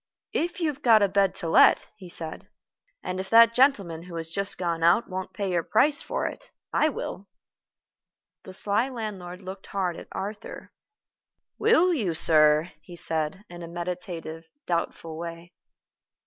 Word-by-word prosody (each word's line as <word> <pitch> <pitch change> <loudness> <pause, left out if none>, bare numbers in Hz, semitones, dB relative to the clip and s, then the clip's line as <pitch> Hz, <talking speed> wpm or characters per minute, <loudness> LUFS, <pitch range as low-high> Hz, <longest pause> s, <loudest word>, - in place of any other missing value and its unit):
"If 350 +4 -1
you 330 - +1
have 290 -1 -6
got 225 -5 +6
a - - +4
bed 195 -1 +2
to 170 - -4
let," 160 - +5
he 190 -4 -12
said, 160 -2 -6 0.6
"and 185 0 -3
if 190 0 -5
that 230 0 +7
gentleman 205 - +2
who 175 0 -10
has 165 -1 -4
just 200 +4 -2
gone 170 -2 -2
out 170 +7 +4
won't 185 0 -5
pay 200 -3 -3
your 175 -1 +1
price 290 - +2
for - - -3
it, - - -6 0.2
I 310 - +3
will." 200 -8 -6 1.1
The - - -11
sly 205 +6 0
landlord 200 -7 -6
looked 190 +1 -9
hard 185 -4 -2
at - - -10
Arthur. 205 +3 -7 0.9
"Will 370 -5 +4
you, 200 - -1
sir?" 155 +1 +4
he 175 - -13
asked, 160 0 -2
in 175 0 -10
a 170 - -7
meditative, 170 -2 -6 0.2
doubtful 165 -2 -3
way. 170 0 -7
185 Hz, 160 wpm, -26 LUFS, 170-215 Hz, 1.1 s, that